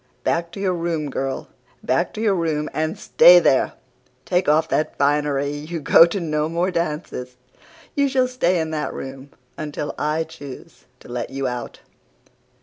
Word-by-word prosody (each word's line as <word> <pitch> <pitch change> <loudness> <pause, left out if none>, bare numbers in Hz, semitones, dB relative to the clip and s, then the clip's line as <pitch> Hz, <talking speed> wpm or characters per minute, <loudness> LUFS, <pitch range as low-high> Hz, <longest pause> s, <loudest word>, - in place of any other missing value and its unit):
'Back 170 0 0
to - - -7
your 190 -2 +1
room, 165 -4 -2
girl! 135 0 -3 0.4
Back - - +1
to 215 - -4
your 215 -3 +3
room 160 -4 -1
and 155 +2 -1
stay 180 0 +7
there! 135 -6 +3 0.5
Take 180 -3 +1
off 155 +2 +3
that 155 0 -1
finery. 145 0 +1
You 155 +3 -5
go 165 +3 +7
to 185 +4 -3
no 155 -2 -1
more 175 +3 0
dances. 150 -7 -4 0.6
You 280 -1 +2
shall 260 -1 +2
stay 185 -9 +1
in 160 -1 -2
that 155 -1 -3
room 135 +1 -8 0.3
until 150 -1 -4
I 155 +2 0
choose 150 -5 -11 0.2
to - - -14
let 120 -1 -4
you 135 0 -3
out. 125 -1 -6
155 Hz, 165 wpm, -22 LUFS, 145-170 Hz, 0.6 s, stay